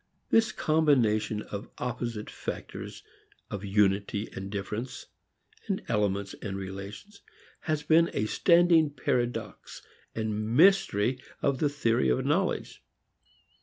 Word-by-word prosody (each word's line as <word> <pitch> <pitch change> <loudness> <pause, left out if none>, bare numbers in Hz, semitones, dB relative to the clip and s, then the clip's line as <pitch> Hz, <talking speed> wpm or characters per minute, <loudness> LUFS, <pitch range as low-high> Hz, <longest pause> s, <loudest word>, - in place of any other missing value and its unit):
This 225 -1 +4
combination 115 - +2
of 100 +1 -7
opposite 120 -3 -4
factors - - -7 0.5
of 100 -1 -4
unity 100 +1 +1
and 95 0 -6
difference, 105 +5 -5 0.8
elements 100 -1 0
and 95 -2 -4
relations, 100 - -8 0.4
has 155 -2 -2
been 165 +2 +4
a 105 - -1
standing 170 - +4
paradox 125 -4 -3 0.3
and 110 +1 -2
mystery 135 - +4 0.2
of 140 -2 +1
the 150 - +2
theory 115 - +1
of 60 - +1
knowledge. - - -1
110 Hz, 105 wpm, -28 LUFS, 100-150 Hz, 0.8 s, This